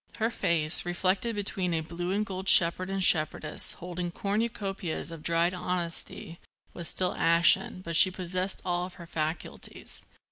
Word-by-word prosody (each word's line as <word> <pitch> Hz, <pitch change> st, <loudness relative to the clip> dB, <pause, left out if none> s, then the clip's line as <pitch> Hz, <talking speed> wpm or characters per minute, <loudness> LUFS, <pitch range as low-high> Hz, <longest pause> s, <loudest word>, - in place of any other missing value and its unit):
Her 225 Hz, +1 st, 0 dB
face, 160 Hz, -6 st, +1 dB
reflected 185 Hz, +6 st, 0 dB
between 190 Hz, -4 st, -1 dB
a 160 Hz, -, 0 dB
blue 175 Hz, +2 st, -5 dB
and 210 Hz, +2 st, 0 dB
gold 190 Hz, -1 st, -3 dB
shepherd 185 Hz, +2 st, +5 dB
and 195 Hz, -1 st, -1 dB
shepherdess 155 Hz, -2 st, +2 dB
holding 175 Hz, 0 st, -5 dB
cornucopias 195 Hz, -4 st, -3 dB
of 165 Hz, -2 st, -8 dB
dried 170 Hz, +2 st, +2 dB
honesty, 175 Hz, -2 st, -3 dB, 0.3 s
was 170 Hz, -2 st, -7 dB
still 185 Hz, +2 st, 0 dB
ashen, 170 Hz, +2 st, +3 dB
but 170 Hz, -2 st, -4 dB
she 185 Hz, -, +8 dB
possessed 185 Hz, +1 st, -3 dB
all 175 Hz, 0 st, -1 dB
her 175 Hz, -1 st, -12 dB
faculties. 160 Hz, 0 st, -4 dB
180 Hz, 145 wpm, -28 LUFS, 170-190 Hz, 0.3 s, she